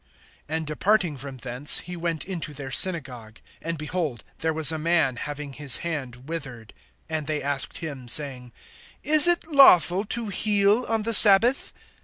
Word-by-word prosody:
(9)And 160 0 -4
departing 175 +2 -1
from 135 0 -8
thence, 125 +3 +2
he 180 - -9
went 170 -2 -5
into 165 -6 -6
their 135 -1 -8
synagogue. 125 -9 +1 0.2
(10)And 165 +1 -4
behold, 150 -5 -5 0.2
there 160 0 -2
was 160 -1 +3
a 160 - -5
man, 160 -5 0
having 145 +2 -8
his 140 -3 +2
hand 130 -6 -7
withered. 130 -9 -9 0.3
And 155 -2 -5
they 155 -1 -3
asked 140 -1 -3
him, 140 -6 -9
saying: 125 -1 -1 0.5
Is 305 +1 +6
it 345 -1 +3
lawful 200 - +4
to 230 +1 -4
heal 205 +3 +1
on 225 -1 -1
the 230 +1 -2
sabbath? 225 +5 +4
155 Hz, 160 wpm, -23 LUFS, 135-190 Hz, 0.5 s, Is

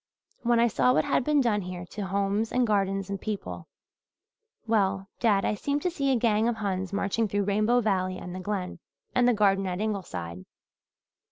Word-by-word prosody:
When 240 -1 +3
I 235 - +5
saw 250 +2 +3
what - - +2
had 275 -2 +1
been 295 +1 +3
done 215 -5 +1
here 180 -1 -6
to 200 -2 -4
homes 200 +3 0
and 250 0 +2
gardens 195 -2 0
and 195 - -4
people 210 -2 -5 1.0
well, 195 -3 +1
dad, 205 -4 +3
I - - +1
seemed 285 +7 -2
to 360 - +1
see 275 -4 0
a - - +3
gang 225 -2 +2
of 240 - +1
Huns 190 -3 -2
marching 200 +2 0
through 205 0 0
Rainbow 215 +5 +2
Valley 185 -4 0
and 180 -1 -7
the 185 - -5
Glen, 185 -2 -4 0.3
and 245 -1 +3
the 245 - +5
garden 195 -2 +3
at 180 0 -3
Ingleside. 90 - -4
205 Hz, 190 wpm, -27 LUFS, 195-230 Hz, 1.0 s, I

